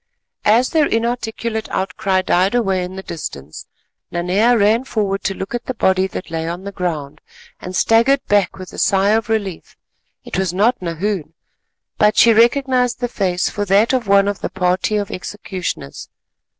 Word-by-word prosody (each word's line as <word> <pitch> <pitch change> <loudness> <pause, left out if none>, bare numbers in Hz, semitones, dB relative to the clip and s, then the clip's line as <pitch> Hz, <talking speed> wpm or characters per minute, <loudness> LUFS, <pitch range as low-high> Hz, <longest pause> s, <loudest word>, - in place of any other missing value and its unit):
As 230 +4 +4
their 310 -2 +3
inarticulate 225 -1 -2
outcry 190 0 -1
died 185 +5 +2
away 195 -6 +1
in 180 +1 -7
the 190 - -7
distance, 75 - -7 0.4
Nanea 195 +8 +2
ran 220 +4 +3
forward 205 -6 -2
to 195 - 0
look 190 +4 -6
at 240 0 -3
the 255 - -4
body 190 -3 +2
that 185 - -7
lay 165 0 -3
on 175 +2 -5
the 200 - -6
ground, 155 -6 -4 0.4
and 180 +1 -7
staggered 235 +8 +3
back 205 -2 +1
with 185 -1 -10
a - - -6
sigh 195 0 +3
of 220 0 +1
relief. 200 -6 -3 0.5
It - - -3
was 185 -2 -1
not 225 +5 +2
Nahoon, 170 -1 -3 0.6
but 210 0 +3
she 230 - +7
recognised 250 +2 +2
the 245 - -1
face 190 -5 -1
for 205 - -3
that 205 +6 +3
of 250 -4 0
one 200 0 +4
of 205 -1 -3
the - - -2
party 185 +3 0
of 205 -1 -3
executioners. 185 - -6
200 Hz, 175 wpm, -19 LUFS, 185-225 Hz, 0.6 s, she